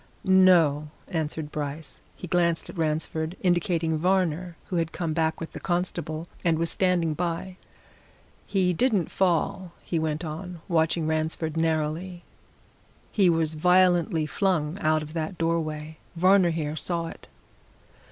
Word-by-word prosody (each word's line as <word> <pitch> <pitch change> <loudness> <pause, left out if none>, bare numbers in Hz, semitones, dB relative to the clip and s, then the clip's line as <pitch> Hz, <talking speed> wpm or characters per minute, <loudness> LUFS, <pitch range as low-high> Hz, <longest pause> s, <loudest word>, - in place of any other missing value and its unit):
"No," 175 -6 +5 0.2
answered 160 -3 -3
Bryce. 145 0 -5
He - - -8
glanced 170 -1 +1
at - - -14
Ransford, 160 +2 -1
indicating 170 -3 +1
Varner, 180 -1 0
who 180 - -3
had 165 -1 0
come 165 -3 -2
back 160 0 0
with 165 - -6
the - - -7
constable 175 -2 -2 0.2
and 165 -2 +2
was 165 0 0
standing 180 -4 +1
by. 175 +2 -3 0.9
"He 185 -3 +2
didn't 205 - +1
fall," 180 0 0
he 165 - -1
went 160 +1 -2
on, 170 +3 -6
watching 165 -1 +1
Ransford 160 0 -1
narrowly. 165 +2 -1 0.9
"He 195 -4 +4
was 165 -2 +1
violently 175 0 +3
flung 165 -3 0
out 155 -4 +2
of 155 +1 -9
that 165 +2 -3
doorway. 160 -2 -2 0.2
Varner 185 +1 +5
here 155 -2 -2
saw 170 +1 -1
it." - - -9
165 Hz, 135 wpm, -26 LUFS, 155-180 Hz, 0.9 s, No